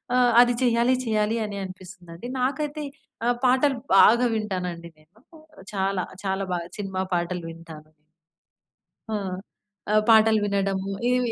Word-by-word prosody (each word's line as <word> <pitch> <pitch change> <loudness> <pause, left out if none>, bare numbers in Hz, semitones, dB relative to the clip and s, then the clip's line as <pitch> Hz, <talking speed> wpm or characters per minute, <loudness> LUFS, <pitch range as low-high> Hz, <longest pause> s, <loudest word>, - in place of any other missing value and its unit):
ఆ! - - +4 0.2
అది 245 0 +4
చెయ్యాలి 240 +1 +3
చెయ్యాలి 215 0 0
అని 200 -1 -6
అనిపిస్తుందండి. 180 +1 -11
నాకైతే 295 +3 -2 0.4
ఆ! - - +3 0.2
పాటలు 260 +2 +3 0.2
బాగా 235 +5 +6
వింటానండి 180 -5 -4
నేను 175 +8 -26 0.5
చాలా. 195 -1 -1 0.2
చాలా 190 0 -1
బాగా 170 0 -5
సినిమా 190 -2 -3
పాటలు 175 0 -2
వింటాను. 160 -2 -13 1.2
ఆ! - - -3 0.8
ఆహ్, 215 0 +4
పాటలు 220 -1 +6
వినడము, 195 -1 -1 0.2
ఇవి 250 -1 +1
200 Hz, 120 wpm, -24 LUFS, 180-235 Hz, 1.2 s, బాగా